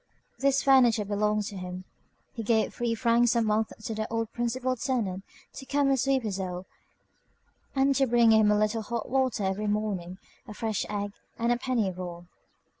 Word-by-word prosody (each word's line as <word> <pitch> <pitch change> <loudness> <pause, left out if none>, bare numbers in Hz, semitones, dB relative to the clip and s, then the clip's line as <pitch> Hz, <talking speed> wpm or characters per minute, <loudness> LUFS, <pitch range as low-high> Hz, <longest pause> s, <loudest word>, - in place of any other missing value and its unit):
This 275 0 +2
furniture 245 -6 +5
belonged 210 +1 0
to 200 -1 -6
him. 180 0 -6 0.5
He 230 - -5
gave 220 0 +1
three 235 -1 -1
francs 235 0 +3
a 235 - +3
month 215 0 +1
to 225 - -3
the 215 0 -4
old 225 -1 -2
principal 250 +2 -1
tenant 230 -8 -2 0.3
to 265 - -9
come 285 -1 +2
and 270 -1 +2
sweep 270 0 +1
his 205 -3 -2
hole, 180 -1 -4 1.1
and 275 +1 +3
to 270 0 +2
bring 235 -1 +5
him 220 -1 +5
a 210 - +4
little 215 +2 +1
hot 235 +1 -4
water 260 -5 +1
every 195 +2 -1
morning, 200 -4 -2 0.3
a 210 - -9
fresh 220 -3 -2
egg, 205 -1 -3 0.3
and 235 +1 +1
a 240 - +2
penny 240 -6 0
roll. 175 -1 -7
220 Hz, 185 wpm, -28 LUFS, 205-245 Hz, 1.1 s, furniture